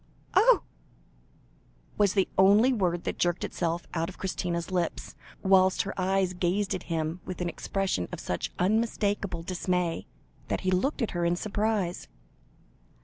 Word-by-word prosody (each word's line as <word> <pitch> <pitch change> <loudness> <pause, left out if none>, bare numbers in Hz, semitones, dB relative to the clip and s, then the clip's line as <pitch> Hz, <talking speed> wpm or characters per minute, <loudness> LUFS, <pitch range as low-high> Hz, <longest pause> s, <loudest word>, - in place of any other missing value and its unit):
"Oh!" - - +5 1.3
was 205 -2 +3
the 195 -2 +3
only 205 +7 +6
word 175 -6 0
that - - -4
jerked 175 0 +1
itself 170 0 -2
out 165 0 -1
of 185 - -11
Christina's 175 -2 -3
lips, 175 -3 -2 0.3
whilst 190 -1 +4
her 195 - -4
eyes 190 0 +1
gazed 185 +3 0
at - - -3
him 165 +1 -2
with 185 - -6
an 180 - -1
expression 185 - -2
of - - -5
such 90 - -3
unmistakable 205 -3 0
dismay, 180 -1 -1 0.4
that - - -1
he 185 - 0
looked 240 +9 +1
at 225 - -1
her 175 -1 -2
in 170 0 +2
surprise. 205 -2 -1
185 Hz, 145 wpm, -28 LUFS, 175-200 Hz, 1.3 s, only